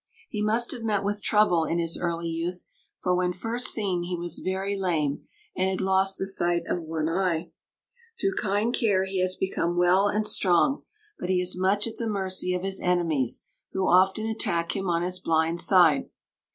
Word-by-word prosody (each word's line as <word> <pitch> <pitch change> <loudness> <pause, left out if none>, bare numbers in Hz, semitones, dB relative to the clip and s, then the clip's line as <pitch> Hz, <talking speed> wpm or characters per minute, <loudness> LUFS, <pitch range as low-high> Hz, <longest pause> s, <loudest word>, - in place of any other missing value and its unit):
He 210 - -4
must 225 +3 +1
have 245 - -6
met 210 -3 0
with 205 +1 -2
trouble 210 -7 +3
in 165 - -1
his 165 -1 0
early 170 -1 -2
youth, 170 +2 -4 0.4
for 180 -1 +2
when 180 0 0
first 230 +6 -1
seen 195 -5 0
he 175 0 -3
was 170 -1 -3
very 190 +2 -2
lame, 160 -7 -1 0.3
and 185 +1 +1
had 190 - -2
lost 190 0 +1
the - - -2
sight 175 -3 +1
of 175 - -2
one 160 -1 -3
eye. 170 -1 -1 0.7
Through 390 -2 0
kind 210 - 0
care 200 -7 +2
he 190 -1 -2
has 185 0 0
become 175 -2 -2
well 180 +3 +4
and 210 +1 0
strong, 200 +9 +2 0.4
but 180 - -4
he 185 -1 +2
is 180 0 0
much 190 +3 +1
at 230 - -6
the 230 -1 -2
mercy 185 -2 0
of 180 - -3
his 195 0 -2
enemies, 165 -8 +1 0.3
who 190 0 0
often 190 +4 +3
attack 170 -7 -1
him 195 -2 -2
on 170 0 +1
his 180 +1 -2
blind 165 0 +1
side. 190 +8 +4
185 Hz, 190 wpm, -26 LUFS, 175-200 Hz, 0.7 s, well